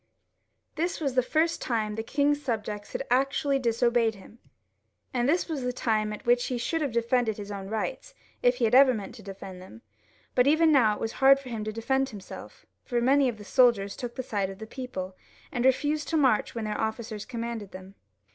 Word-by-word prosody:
This 345 +3 -1
was 280 -5 -1
the 255 - +4
first 320 +6 0
time 220 -3 -1
the 225 - -3
king's 290 +5 +1
subjects 210 -5 -4
had - - -2
actually 275 +2 +2
disobeyed 235 -2 +2
him, 205 +4 -15 0.7
and 245 +1 +1
this 345 +4 +2
was 310 -5 -3
the 250 0 -1
time 215 -3 0
at 210 - -8
which 245 0 +3
he 250 - -2
should 320 +7 -1
have 285 -4 -1
defended 235 -1 +1
his 205 -1 -7
own 195 -1 -6
rights, - - -4 0.3
if 245 0 +4
he 245 -2 +1
ever 255 +3 +6
meant 205 -3 -6
to - - -12
defend 190 -2 -9
them; 115 -12 -13 0.5
but 250 +1 +3
even 315 +2 +5
now 230 -7 +4
it - - -10
was 225 - -2
hard 275 +1 +7
for 270 -2 -10
him 225 -3 -4
to 215 - -2
defend 265 +5 0
himself, 205 -5 -10 0.2
for 240 -2 -1
many 265 +2 +4
of 230 - -6
the 210 - -11
soldiers 225 -6 +3
took 240 -1 -6
the 260 - -4
side 200 -5 -2
of 195 - -8
the 220 - -8
people, 220 -7 -6 0.4
and 245 0 -1
refused 290 +3 +2
to 325 - 0
march 260 -8 +2
when 225 -2 -3
their 210 0 -2
officers 220 -1 -3
commanded 230 -4 -5
them. 185 +1 -11
240 Hz, 210 wpm, -27 LUFS, 215-270 Hz, 0.7 s, hard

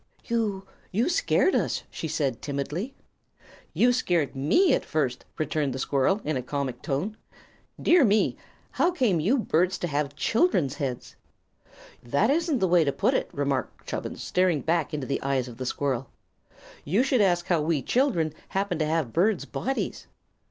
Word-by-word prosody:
"You 215 -5 -1 0.3
you 225 - +1
scared 380 -3 +2
us!" - - 0
she 160 - -4
said, 140 -6 -1
timidly. 150 - -4 0.8
"You 245 +1 +3
scared 175 - 0
me, 210 - +3
at - - +1
first," 135 -6 -2
returned 150 -3 -1
the - - -4
squirrel, 140 +9 +1
in 155 0 0
a 130 - -1
comic 130 -1 -4
tone. 180 +11 -2 0.6
"Dear 345 -3 +5
me! 215 -2 +3 0.4
how 345 - +2
came 250 - +1
you 210 - +2
birds 185 -5 +1
to - - -3
have 145 -2 -2
children's 175 - +2
heads?" 135 -4 -5 0.9
"That 140 - +1
isn't 325 -1 +1
the 190 - +1
way 175 -1 +5
to 140 - +1
put - - +1
it," - - 0
remarked 140 -2 -2
Chubbins, - - -5
staring 180 -5 +1
back 165 +2 0
into 150 -4 -3
the 140 - -2
eyes 135 -2 0
of 120 -2 -10
the 130 0 -4
squirrel. 135 -2 -2 0.7
"You 195 - +2
should 260 -4 +2
ask 175 -3 +2
how 170 -4 +2
we 150 -3 0
children 200 - +1
happened 195 -3 -1
to 155 - +1
have 155 -7 -1
birds' 195 +3 +2
bodies." 270 +1 -3
165 Hz, 165 wpm, -26 LUFS, 140-215 Hz, 0.9 s, Dear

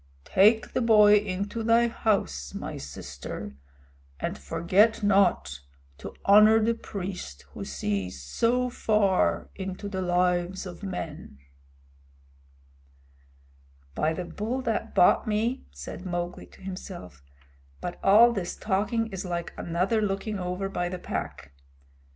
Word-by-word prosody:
Take 215 +4 +4
the - - +1
boy 210 -3 +6
into 200 +2 -3
thy 230 +1 +4
house, 75 - -1
my - - -5
sister, 70 -1 -7 0.6
and - - -3
forget 185 - +2
not 190 - +2 0.4
to - - -8
honor 215 +2 +7
the 225 +1 +2
priest 185 - -7
who - - -7
sees 90 +5 -3
so 235 - 0
far 210 -5 +1
into 190 +1 -6
the 190 -2 -3
lives 180 +1 0
of 180 -2 -9
men." 165 - -6 2.6
"By 155 - 0
the 180 +2 -4
Bull 215 +9 -3
that 225 -2 -2
bought 180 - +5
me," 220 +4 -1
said 70 - -9
Mowgli 175 -1 -4
to - - -19
himself, 185 - -8 0.6
"but 175 - -6
all 220 +5 +7
this 185 -5 -3
talking 215 +3 0
is 190 0 -5
like 175 -2 -4
another 185 +6 0
looking 205 0 -2
over 180 +2 -3
by 175 -2 -2
the 185 - -4
Pack! 70 - -6
190 Hz, 125 wpm, -27 LUFS, 175-215 Hz, 2.6 s, honor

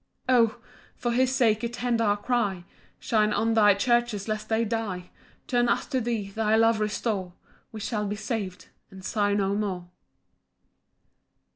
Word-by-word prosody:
12 240 -3 +5
O! - - -23 0.4
for 240 - -2
his 255 +2 +2
sake 230 -5 +2
attend 240 0 -1
our 205 -2 +2
cry, 205 -5 -1 0.3
Shine 215 -2 +1
on 225 +1 +1
thy 210 -3 +6
churches 240 -1 +1
lest 215 0 -3
they 225 +1 +2
die; 205 -5 -3 0.3
Turn 240 -1 +1
us - - +1
to 260 -3 -1
thee, 220 -4 -2
thy 220 +1 +1
love 225 0 +4
restore, 210 -3 -2 0.4
We 220 - -7
shall 210 -1 -2
be 205 - -2
sav'd, 210 -4 -4 0.2
and 190 -2 -12
sigh 205 -1 +1
no 200 -1 +1
more. 190 -4 -3
215 Hz, 155 wpm, -26 LUFS, 205-235 Hz, 0.4 s, thy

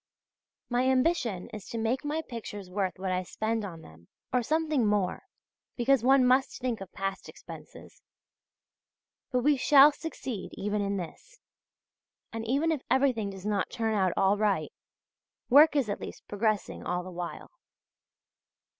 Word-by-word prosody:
My 245 +1 +1
ambition 255 - +1
is 210 -3 -9
to 230 - -4
make 230 +5 -1
my 305 +2 -2
pictures 205 -5 -7
worth 190 -2 -2
what 185 0 -3
I 185 0 0
spend 220 +4 -2
on 170 -5 -8
them; 80 +2 -16 0.3
or 250 - +3
something 310 -2 +1
more, 205 - 0 0.5
because 260 +1 +3
one 265 0 +5
must 260 +2 +2
think 245 -5 -2
of 195 - -8
past 195 0 -4
expenses. - - -12 1.3
But 250 -1 +1
we 290 0 +4
shall 280 +2 +7
succeed 270 - -6
even 210 +1 -2
in 200 0 -1
this; 190 - -9 0.9
and 225 0 -4
even 285 +7 +1
if 305 -5 -1
everything 255 -6 +2
does 195 0 -9
not 205 -2 0
turn 225 -1 -1
out 190 -3 +2
all 195 +2 +3
right, 200 -8 0 0.8
work 300 +3 +7
is 275 -6 +2
at 205 - -3
least - - -9
progressing 210 -1 -1
all 180 0 -2
the 185 - -8
while. 175 -1 -6
220 Hz, 155 wpm, -29 LUFS, 195-265 Hz, 1.3 s, shall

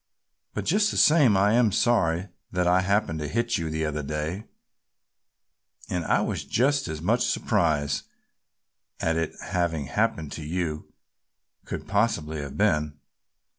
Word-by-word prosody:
But - - -3
just 205 +4 +3
the - - -3
same 145 -10 +5
I 100 +2 +3
am 115 -2 +4
sorry 95 -5 +1 0.2
that 90 -1 0
I 90 +1 +4
happened 100 -4 0
to 75 - -3
hit 115 +6 0
you 80 -1 -3
the 80 0 -2
other 75 0 -2
day 75 +7 -4 1.5
and 90 -1 -1
I - - +2
was - - -2
just 135 +1 +1
as 80 0 -5
much 115 +7 +2
surprised 80 - 0 0.9
at 80 0 0
its 80 -1 -3
having 85 -5 -1
happened 75 +2 -1
as - - -6
you 80 0 -4 0.7
could - - -6
possibly 80 -8 0
have 70 -1 -7
been." 75 -8 +1
85 Hz, 145 wpm, -26 LUFS, 75-105 Hz, 1.5 s, same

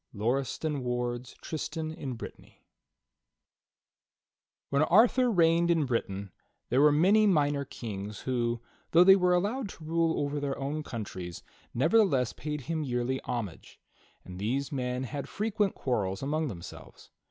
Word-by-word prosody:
'" - - -19
Lauriston 135 +6 -1
Ward's 125 0 -3
"Tristan 155 0 -4
in 140 -5 -5
Brittany," 115 - -11 2.1
Arthur 220 - +5
reigned 170 -4 +3
in 165 -3 +3
Britain 100 -6 -2 0.4
there 130 +3 +3
were 150 0 +7
many 195 +8 +5
minor 145 -6 +2
kings 105 -6 -6
who, 120 -2 -1 0.3
though 170 +2 +8
they 190 +1 +8
were 180 -2 +3
allowed 205 +6 -1
to 165 - -11
rule 165 +1 +1
over 145 0 -1
their 140 -1 -2
own 145 +3 -3
coun 115 -7 -5
tries, 90 -3 -8 0.3
nevertheless 145 - +3
paid 150 -1 -4
him 160 +3 -2
yearly 125 0 -1
homage, 115 -9 -5 0.5
and 90 0 -9
these 130 +7 -1
men 125 -2 -2
had 140 +2 -5
frequent 210 -1 0
quarrels 100 -5 -1
among 155 +3 0
themselves. 90 -9 -10
140 Hz, 140 wpm, -29 LUFS, 120-165 Hz, 2.1 s, though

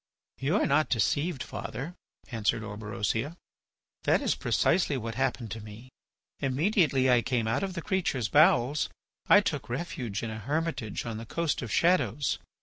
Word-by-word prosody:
"You 145 +7 +1
are - - +3
not 150 +2 +2
deceived, 145 +5 +1
father," 135 +10 -6 0.4
answered 115 -1 0
Orberosia. 110 - -3 0.7
"That - - +4
is - - +1
precisely 175 -6 +1
what 115 -2 -4
happened 125 -2 -1
to 110 +1 -5
me. 110 +4 -11 0.5
Immediately 140 0 +2
I 120 -1 +5
came 120 -2 0
out 115 - +1
of 190 -2 -3
the 170 - -4
creature's 165 - 0
bowels 145 +1 +4 0.4
I 205 - +8
took 150 -11 -3
refuge 120 - -3
in 115 - -3
a 110 - -5
hermitage 145 -3 -2
on 115 -2 -4
the 115 0 -8
Coast 170 +2 -1
of 115 -5 -5
Shadows. 145 - +2
130 Hz, 155 wpm, -29 LUFS, 115-155 Hz, 0.7 s, I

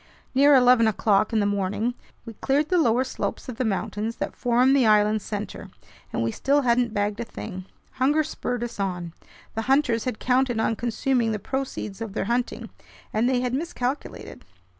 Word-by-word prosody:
Near 280 +2 +6
eleven 250 -3 +6
o'clock 215 0 +2
in 220 - +2
the 205 - +2
morning, 205 +4 -1 0.3
we 230 - -8
cleared 285 +7 0
the 360 - +3
lower 245 -4 +3
slopes 260 - -4
of 250 -3 -6
the 255 - 0
mountains 215 +1 -2
that - - -4
form 250 +2 +3
the 265 -5 +4
island's 210 0 +3
center, 205 -2 -6 0.4
and 115 - -1
we 115 - 0
still 280 - +1
hadn't 240 -1 +2
bagged 205 0 -1
a - - -1
thing. 185 -5 -8 0.3
Hunger 290 +4 +2
spurred 245 -5 -4
us 240 -3 -6
on. 180 -4 -3 0.4
The 225 - -2
hunters 265 -5 +2
had 250 -4 -2
counted 250 -1 +1
on 225 0 +1
consuming 235 0 0
the - - -1
proceeds 225 -2 -4
of 220 -3 -5
their - - -2
hunting, 240 +3 -2 0.4
and 225 +3 +2
they 250 -1 +1
had 250 -1 -2
miscalculated. 275 -2 -4
235 Hz, 185 wpm, -25 LUFS, 210-260 Hz, 0.4 s, Near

